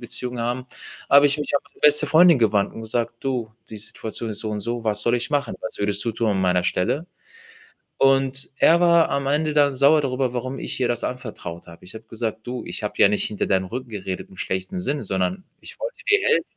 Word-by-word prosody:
Beziehungen 125 0 0
haben. 125 +2 -2 0.4
Habe 140 +1 +7
ich 145 +1 0
mich 145 - -3
an - - +3
meine - - -25
beste 150 0 +4
Freundin 165 -1 +6
gewandt 105 -3 +1
und - - -7
gesagt: 115 +1 -2
„Du, 125 -5 -2 0.2
die 110 - -7
Situation 110 +1 -4
ist 105 - 0
so 110 - -3
und 105 -1 -3
so, 120 +3 -3
was 105 -1 +2
soll 120 +2 +2
ich 120 +5 -2
machen? 145 -1 -1
Was 110 - -5
würdest 100 +1 -1
du 115 - 0
tun 115 -1 0
an 95 -1 0
meiner 90 -1 +2
Stelle?“ 125 - 0 0.9
Und 135 0 +2
er 165 +4 +5
war 170 -1 +5
am 140 -1 -1
Ende 150 +2 0
dann 145 -2 +4
sauer 140 +4 +4
darüber, 130 -2 -1
warum 130 +2 -4
ich - - -5
ihr 125 - +1
das 120 -1 -1
anvertraut 110 -9 -6
habe. 85 0 -14
Ich 90 +4 -12
habe 110 0 -10
gesagt: 110 0 -5
„Du, 125 -1 -4
ich - - -4
habe 105 - -3
ja - - +7
nicht 105 - 0
hinter 105 - -2
deinem 95 -1 +1
Rücken 125 +7 -6
geredet 95 -4 -6
im 95 - -17
schlechten 95 - -3
Sinn, 150 -5 -1
sondern 100 - -2 0.2
ich - - -12
wollte - - -4
dir 415 0 +6
helfen“ 465 - +3
120 Hz, 230 wpm, -23 LUFS, 105-140 Hz, 0.9 s, Habe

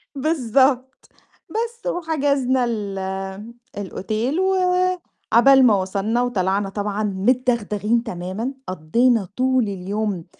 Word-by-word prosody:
بالضبط، 265 -2 +1 0.4
بس 465 +2 -4
وحجزنا 280 - +1
ال 210 -4 -3 0.8
الأوتيل 215 - -2
وعبال 360 -9 +3
ما 220 -4 +5
وصلنا 200 +5 -1
وطلعنا 195 -4 0
طبعًا 205 +1 -3
متدغدغين 225 +1 0
تمامًا، 195 +5 -4
قضّينا 200 +6 +1
طول 260 0 +2
اليوم 200 -2 -3
235 Hz, 85 wpm, -21 LUFS, 205-270 Hz, 0.8 s, ما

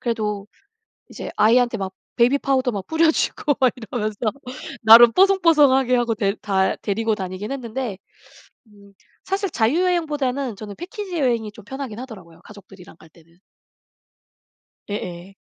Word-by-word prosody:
그래도 210 -4 -3 0.6
이제 - - -7
아이한테 240 +2 +3
막 190 -2 -5 0.2
베이비파우더 260 +1 +2
막 200 -3 -6
뿌려 320 0 +3
주고 295 -2 0
막 260 -2 +4
이러면서 220 -2 -4 0.7
나름 230 +2 +9
뽀송뽀송하게 305 -10 +4
하고 240 -2 0
데 200 -3 0
다 190 -2 +1
데리고 225 +2 -1
다니긴 190 +2 -6
했는데 245 -5 -4 0.7
음 200 -1 -20 0.3
사실 390 0 -2
자유여행보다는 285 - 0
저는 205 0 -9
패키지 375 -1 -6
여행이 235 -6 0
좀 205 0 -15
편하긴 260 -2 -7
하더라고요 190 -10 -11
가족들이랑 195 -4 -15
갈 160 - -18
때는. 165 +1 -24 1.5
예예. 185 -1 -6
230 Hz, 325 characters per minute, -21 LUFS, 205-275 Hz, 1.5 s, 나름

